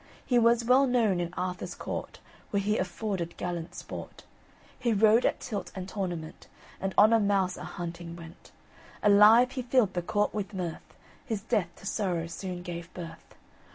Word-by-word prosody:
He 245 -2 +3
was 235 0 +4
well 260 +3 +5
known 225 -7 +2
in 175 -1 -2
Arthur's 180 0 -3
court, - - -5 0.3
Where 200 - +1
he 210 +2 0
afforded 185 -1 -3
gallant 175 -1 -4
sport; - - -8 0.6
He 240 -3 +1
rode 220 +3 +5
at - - -1
tilt 205 -6 -5
and 185 -1 -5
tournament, 175 -5 -5 0.3
And 195 0 -3
on 215 +2 +7
a 225 - +6
mouse 195 -3 +1
a - - -8
hunting 170 -1 -6
went. 170 +1 -13 0.5
Alive 210 +5 +7
he 260 - -3
filled 245 -4 +2
the 175 - -1
court 205 +4 0
with 205 -1 -4
mirth; 175 -3 -5 0.3
His 225 -7 -3
death 215 -7 0
to - - -15
sorrow 185 -5 -1
soon 180 +1 -6
gave 175 0 -6
birth. 170 -2 -9
195 Hz, 170 wpm, -29 LUFS, 175-220 Hz, 0.6 s, on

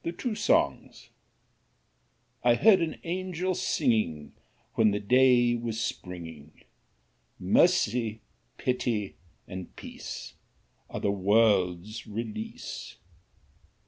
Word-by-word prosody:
1757–1827) 215 +6 -1 1.3
I - - +5
HEARD 205 -5 +5
an 165 -1 -2
Angel 185 +1 -2
singingWhen 110 - -1
the 105 - 0
day 125 +2 +4
was 115 -1 -3
springing:"Mercy, 90 - -2 0.4
pity, 115 -5 -1 0.3
and 95 -1 -8
peace, - - -8 0.6
Are - - -5
the 100 - +1
world's 100 0 +2
release." 110 0 -6
110 Hz, 75 wpm, -28 LUFS, 95-130 Hz, 1.3 s, I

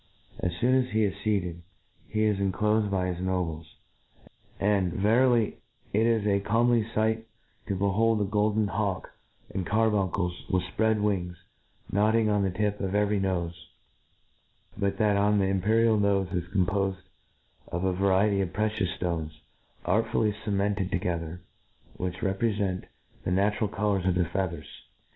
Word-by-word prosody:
As 90 - 0
feon 120 +8 +1
as 125 - -9
he 110 0 +3
is 100 -3 +1
featcd, 95 -5 -1 0.5
he 110 0 0
is 105 -1 +3
cur 100 -1 +1
clofed 105 +2 +1
by 95 -2 0
his 85 - -8
nobles; 85 -4 -3 0.8
and, 100 -3 +2
verily, 115 +2 +2 0.3
it 110 +3 +3
is 115 -3 +2
a 100 -1 +3
comer 115 +4 +2
ly 115 - +2
fight 110 +1 +1 0.4
to 100 - -1
behold 105 +4 +2
^ 100 -2 -1
golden 105 0 +2
hawk 100 -3 -2 0.4
and 95 - -2
carbuncle^ 100 -3 +1 0.2
with 95 -2 +1
fpread 110 -1 +2
wings, 90 -4 -1 0.5
nodding 110 +2 +3
on 105 -1 +2
the 95 - +1
tip 105 +2 -1
of 95 0 -2
every 105 0 +2
nofe; 90 -3 -1 1.2
but 100 -1 -1
that 105 -1 +3
on 105 +1 +3
the 100 - +2
imperial 110 +4 +2
nofe 100 -2 +1
is 90 -1 -1
compofed 95 +1 0 0.6
of 85 +1 -3
a 95 -1 +1
variety 100 +2 +2
of 90 -3 -2
precious 105 -3 0
fto^es, 85 -3 -2 0.6
artfully 105 +2 +1
cemented 100 -2 0
to - - 0
gether, 85 0 -3 0.6
which 90 0 -4
reprefent 100 -1 -1 0.4
the - - -2
natural 105 +4 +1
colours 100 -2 0
of 90 - +2
the 90 -1 +2
feathers. 85 -3 -3
100 Hz, 155 wpm, -27 LUFS, 95-105 Hz, 1.2 s, he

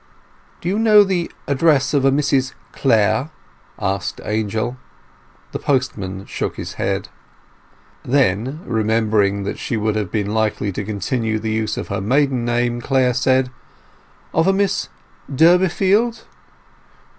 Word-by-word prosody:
"Do - - -5
you 200 +4 0
know 215 -2 +7
the 185 -3 -1 0.2
address 140 0 +2
of 140 -2 +2
a 135 - +5
Mrs 135 -2 +1 0.2
Clare?" 115 +2 +2 0.5
asked 95 -1 -2
Angel. 110 +3 -2 0.7
The - - -4
postman 100 -8 -2
shook - - -4
his - - -6
head. - - -2 0.9
Then, 130 - +1
remembering 110 -3 +1
that 100 - -4
she 115 - -2
would 110 0 0
have 105 -4 -2
been 105 -1 -1
likely 110 -2 0
to 100 - -4
continue 110 +2 -2
the 110 0 -3
use 110 -1 -1
of - - -5
her 100 -1 -2
maiden 130 +3 +1
name, 120 0 0
Clare 130 -1 +2
said— 130 +1 +2 0.8
"Of 165 +3 +2
a 195 - +4
Miss 195 0 0 0.4
Durbeyfield?" 190 - +3
125 Hz, 135 wpm, -20 LUFS, 110-145 Hz, 0.9 s, know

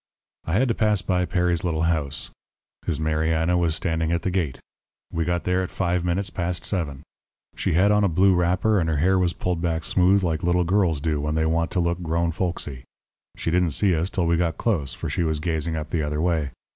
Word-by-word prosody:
"I 80 - -1
had 125 +7 +3
to - - +3
pass 105 -4 +1
by 90 -1 +1
Perry's 90 -2 0
little 80 -3 0
house. 75 -4 -1 0.6
His 80 -3 0
Mariana 80 +2 +1
was 85 -3 +1
standing 80 -1 -1
at 85 +1 0
the 95 - 0
gate. 85 -8 -1 0.6
We 80 -1 0
got 85 0 -1
there 90 +1 +1
at 90 - -3
five 90 -1 -1
minutes 90 +3 -1
past 90 0 -3
seven. 75 -8 -3 0.5
She - - -1
had 95 +5 +4
on 105 0 +3
a - - +4
blue 95 +3 +4
wrapper, 90 +4 +2
and 80 -2 0
her 80 - 0
hair 95 +5 +3
was 90 -1 +1
pulled 90 -2 -2
back 80 -2 -1
smooth 95 +5 +3
like 80 -3 0
little 90 +1 +2
girls 85 -4 +1
do 75 -2 -1
when 75 +1 -1
they 80 0 +1
want 85 +1 +1
to 95 - +1
look 85 0 0
grown 85 0 0
folksy. 80 -7 -3 0.5
She 85 - -2
didn't 90 -2 +2
see 95 -4 +3
us 85 +4 -1
till 95 -5 -1
we 85 0 +2
got 85 -2 0
close, 75 - -1
for - - -5
she - - -2
was 80 -2 0
gazing 80 0 -1
up 75 -1 -5
the 85 - 0
other 75 0 -2
way. 80 -4 0
85 Hz, 225 wpm, -24 LUFS, 80-90 Hz, 0.6 s, had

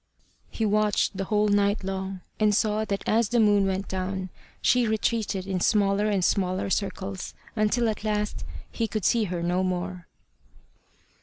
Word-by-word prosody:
He 225 - -2
watched 210 -1 +2
the 195 0 -2
whole 210 +1 +2
night 205 0 +2
long, 190 0 -4 0.2
and 210 -1 +3
saw 215 0 +1
that 200 -2 -3
as 225 -1 +2
the 240 - +2
moon 205 -2 +4
went 190 +1 -2
down 190 0 -3 0.3
she 245 -2 +3
retreated 215 -3 -1
in 190 -1 -2
smaller 200 +1 +2
and 195 -4 +1
smaller 185 -1 0
circles, 195 -1 -3 0.2
until 225 +2 +2
at 215 -1 -2
last 210 -1 -1 0.3
he 230 - -1
could 215 -3 -3
see 230 -2 +3
her 175 -2 -3
no 175 +2 +1
more. 180 -1 -3
200 Hz, 160 wpm, -26 LUFS, 190-215 Hz, 0.3 s, moon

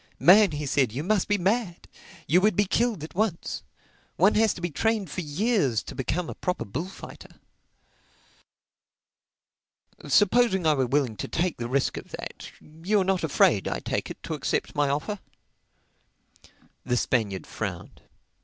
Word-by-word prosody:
"Man," 200 +3 +7
he 150 0 -3
said, 135 -4 +1
"you 135 +7 -4
must 200 +1 +1
be 205 - +2
mad! 195 -1 -1 0.4
You 175 +5 +4
would 210 -1 +3
be 205 - +3
killed 220 -3 0
at 155 -2 -8
once. 200 -3 -2 0.5
One 195 +5 +4
has 220 -1 +3
to - - -8
be 175 -1 -2
trained 215 +1 0
for 185 - -3
years 155 - 0
to - - -8
become 155 +6 -2
a - - -5
proper 180 - -3
bullfighter." 160 - -8 2.7
"Supposing 205 -3 +3
I 155 - +5
were 135 -3 0
willing 130 -4 0
to - - -4
take 175 0 -1
the 120 - -4
risk 135 +1 0
of - - -8
that—You 170 +7 -4
are - - +2
not 190 -1 0
afraid, 110 -9 +3
I - - -2
take - - -3
it, - - -9
to - - -4
accept - - -2
my 145 -1 +1
offer?" 150 +9 -2 1.6
The 125 - 0
Spaniard 105 -7 0
frowned. - - -6
175 Hz, 155 wpm, -26 LUFS, 140-205 Hz, 2.7 s, Man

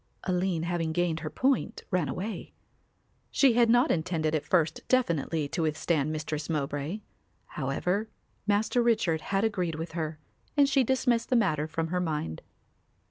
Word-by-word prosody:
Aline 180 -2 0
having 170 -2 -1
gained 175 -1 0
her 155 - -4
point 260 - 0
ran 180 -7 +1
away. 185 +8 -5 0.8
She 270 -4 +4
had 235 0 +4
not 245 +5 +5
intended 160 -2 0
at 155 -2 0
first 165 -3 +2
definitely 165 - +1
to 170 - -2
withstand 155 -1 0
Mistress 155 0 -3
Mowbray. 145 +5 -2 0.5
However, 180 +10 -1 0.4
Master 210 +4 +2
Richard 215 -9 +2
had 195 +4 0
agreed 185 -7 0
with 160 +2 -5
her 160 -2 -3 0.4
and 285 -1 +6
she 270 -1 +3
dismissed 245 -2 +1
the 255 - +3
matter 155 -10 +2
from 160 +1 -2
her 180 +1 0
mind. 150 - -2
170 Hz, 150 wpm, -28 LUFS, 155-215 Hz, 0.8 s, and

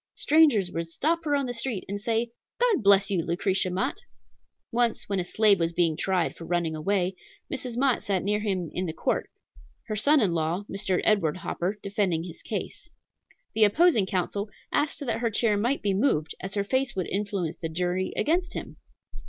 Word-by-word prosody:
Strangers 285 - +4
would 165 0 -4
stop 330 - 0
her 290 -1 +2
on 280 -1 0
the 245 - -3
street 230 -4 -3
and 200 +1 -4
say, 230 +1 0 0.3
"God 475 - +3
bless 200 0 +5
you, 185 -4 +2
Lucretia 185 +3 0
Mott!" 195 +10 -1 0.7
Once, 235 -1 0
when 200 -1 -1
a - - 0
slave 205 +2 +3
was 165 0 0
being 170 -2 +2
tried 185 0 0
for - - -10
running 170 -2 0
away, 185 +3 0 0.4
Mrs. 250 -3 -4
Mott 265 -1 +2
sat 195 -3 -1
near 210 +2 +1
him 190 -6 -2
in 185 0 -2
the 160 - -3
court, - - -1 0.6
her 215 - -3
son 285 +8 +4
in 205 -7 +2
law, 165 +4 -1
Mr. 190 -2 -1
Edward 185 -7 +2
Hopper, 185 +3 -3
defending 195 -5 0
his 175 -1 -9
case. - - -5 0.6
The 220 - +4
opposing 220 - +4
counsel 200 +3 -2 0.2
asked 295 0 0
that 230 -2 -1
her 235 -1 +1
chair 215 0 +2
might 240 +7 0
be 200 -1 +1
moved, 190 - +1
as 195 +2 -5
her 200 - +1
face 260 +4 0
would 185 -2 -1
influence 195 -4 -2
the 165 - -4
jury 180 +3 -1
against 350 +4 +1
him! - - -7
200 Hz, 190 wpm, -27 LUFS, 180-235 Hz, 0.7 s, bless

